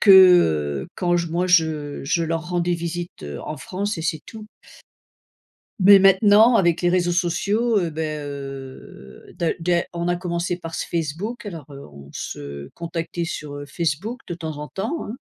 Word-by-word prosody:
que, 200 - +5 0.7
heu, - - -10
quand 175 -1 +1
je 170 -1 -1
moi, 175 +3 0
je 160 -5 +1
je 165 +4 +1
leur 165 +1 -2
rendais 175 0 0
visite, 170 +1 -5
heu, 75 -1 -6
en 155 - -5
France 200 +8 -3
et - - -4
c'est 160 -1 -1
tout. 220 -1 -10 1.3
Mais, 200 +1 +8
maintenant, 205 +4 +6
avec 170 -3 +2
les 175 - +3
réseaux 175 -1 +2
sociaux, 200 +6 +1
heu, 175 -3 -1
beh, 160 +1 -3 0.2
heu, 135 - -9
d'a 170 - 0
d'a 170 0 +1
on 170 0 -2
a 175 - +1
commencé 175 0 -2
par 165 -2 -7
ce - - -3
Facebook, 175 +8 -3
alors, 165 -7 -7
heu, 140 0 -10
on 70 -1 -14
se 70 0 -7
contactait 170 0 -4
sur, 150 -3 -5
heu, 145 - -6
Facebook, 170 - -3
de 175 - -4
temps 160 -3 -6
en 150 0 -6
temps, 300 +12 -3
hein. 225 - -6
170 Hz, 180 wpm, -22 LUFS, 155-185 Hz, 1.3 s, Mais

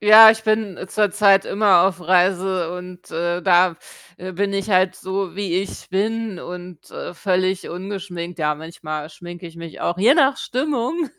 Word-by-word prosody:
Ja, 220 +1 +10
ich 220 0 -2
bin 215 -3 -1
zurzeit 205 -1 +3
immer 200 -4 +4
auf 190 -1 0
Reise 180 0 +1
und, 180 0 -10
äh, 175 +2 -1
da, 180 -2 +3 0.4
äh, 185 +1 -7
bin 200 +2 -1
ich 195 +1 -3
halt 185 0 +3
so, 190 -2 -4
wie 195 -4 -2
ich 195 - -8
bin 215 0 -2
und, 180 -2 -10
äh, - - -7
völlig 185 +1 -1
ungeschminkt. 180 -2 -6
Ja, 150 -1 +1
manchmal 155 -1 -7
schminke 175 +2 -10
ich 165 0 -13
mich 165 -1 -9
auch, 175 - -2
je 225 +8 +5
nach 275 -4 +3
Stimmung. 275 +4 -2
185 Hz, 165 wpm, -21 LUFS, 175-205 Hz, 0.4 s, Ja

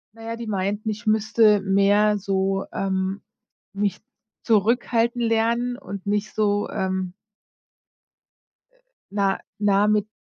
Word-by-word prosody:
Na 225 - -12
ja, 230 0 -4
die 235 - -7
meinten, 205 +2 -2
ich 215 +2 -5
müsste 215 -1 +4
mehr 200 +2 +3
so, 195 0 -1
ähm, 190 0 -2 0.5
mich 200 0 -1 0.4
zurückhalten 235 +2 +2
lernen 235 +2 +1
und 200 0 -8
nicht 210 +1 -1
so, 205 -1 0
ähm 190 -2 -2 1.6
äh, - - -33 0.3
nah 195 -1 0 0.2
nah 205 0 +3
mit 210 0 +2
205 Hz, 120 wpm, -23 LUFS, 195-220 Hz, 1.6 s, müsste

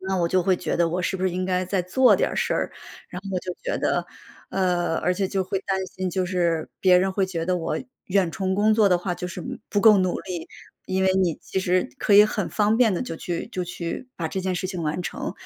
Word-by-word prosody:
那 190 0 -2
我 170 - +2
就 185 0 +2
会 185 0 +2
觉 - - -2
得 170 -1 +2
我 175 +2 -1
是 190 +2 -1
不 185 - -6
是 185 - +2
应 185 +1 -2
该 185 0 0
再 185 0 0
做 245 +9 +4
点 - - +1
儿 - - -5
事 - - 0
儿， - - -1 0.4
然 180 - -7
后 185 - 0
就 180 0 -5
觉 - - -2
得 - - 0 0.5
呃， 175 -3 +1
而 180 - +1
且 195 -1 -1
就 190 -1 -1
会 190 +1 -2
担 195 0 0
心， 185 0 -4
就 185 0 -1
是 170 -3 0
别 185 -1 +6
人 190 +1 +1
会 195 0 +1
觉 170 -3 -3
得 185 - +1
我 165 - -2 0.3
远 185 -3 +2
程 190 -3 -1
工 215 +2 +3
作 215 -2 +5
的 180 - +3
话 180 0 -2
就 180 - -5
是 180 0 -7 0.3
不 205 - +1
够 215 -1 +7
努 185 -1 0
力。 175 -3 -6 0.4
因 190 0 0
为 190 - +4
你 180 -4 +1
其 190 - -3
实 185 -5 +1
可 - - 0
以 205 +1 +9
很 - - -3
方 215 +1 +2
便 230 -3 +4
地 180 - -1
就 165 - -4
去 175 0 -4
就 180 -4 -3
去 175 +7 -5
把 165 -2 -2
这 190 - -4
件 185 0 -1
事 185 - -2
情 180 -3 -4
完 155 +3 -1
成， - - -5
然 - - -2
185 Hz, 285 characters per minute, -24 LUFS, 175-190 Hz, 0.5 s, 以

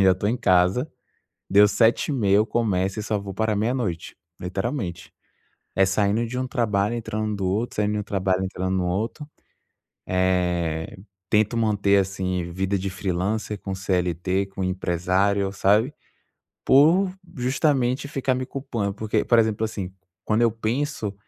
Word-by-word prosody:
assim, 95 - +5
já 95 - +6
estou 100 +3 -1
em 120 - +1
casa. 90 - +2 0.6
Deu 100 +1 +6
7h30, 115 -2 +2
eu 110 +2 +3
começo 100 -4 0
e - - -2
só 105 -1 -1
vou 100 -1 -7
parar 110 0 0
meia-noite, 110 -5 -2 0.2
literalmente. 90 - -4 0.6
É 95 - +5
saindo 100 +4 +1
de 125 +2 -4
um 130 - -2
trabalho, 105 -2 0
entrando 110 -2 -3
do 95 -1 -3
outro, 105 +6 -1
saindo 105 0 +1
de 105 - -1
um - - -3
trabalho, 95 -1 0
entrando 95 0 -2
no 90 -1 0
outro. 115 - -3 0.8
Eh, 90 -3 0 0.3
tento 110 +2 +2
manter, 105 -3 +2
assim, 95 -1 -2
vida 95 +2 -1
de 95 +1 -3
freelancer, 100 +3 -2
com 95 -1 -5
CLT, 95 0 -1
com 95 0 -5
empresário, 95 +2 0
sabe. 105 +8 +2 0.7
Por 170 +8 +5 0.2
justamente 130 +1 +1
ficar 135 -2 0
me 130 - -2
culpando, 120 -7 -3
porque 110 0 -1
por 120 - +4
exemplo, 110 -1 +2
assim, 100 -4 -4 0.3
quando 110 +2 +1
eu 115 - +4
penso 115 -1 -2
100 Hz, 150 wpm, -24 LUFS, 95-115 Hz, 0.8 s, já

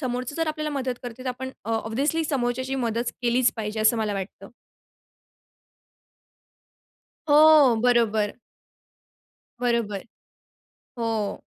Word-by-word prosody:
समोरचं 255 0 -3
जर 325 -1 0
आपल्याला 305 0 -3
मदत 260 -2 -2
करते, 245 +1 -8
तर 260 - -4
आपण 260 +1 -5
अ, 225 - -4
ऑब्व्हियसली 270 +9 -1
समोरच्याची 260 -1 -1
मदत 230 +2 -1
केलीच 240 +1 +2
पाहिजे, 215 0 -3
असं 220 +2 +4
मला 215 -2 -1
वाटतं. 195 0 -7 2.8
हो, 295 -4 +7
बरोबर. 225 -4 +2 1.3
बरोबर. 235 -5 -1 0.9
हो. 225 -3 -2
245 Hz, 105 wpm, -25 LUFS, 220-265 Hz, 2.8 s, हो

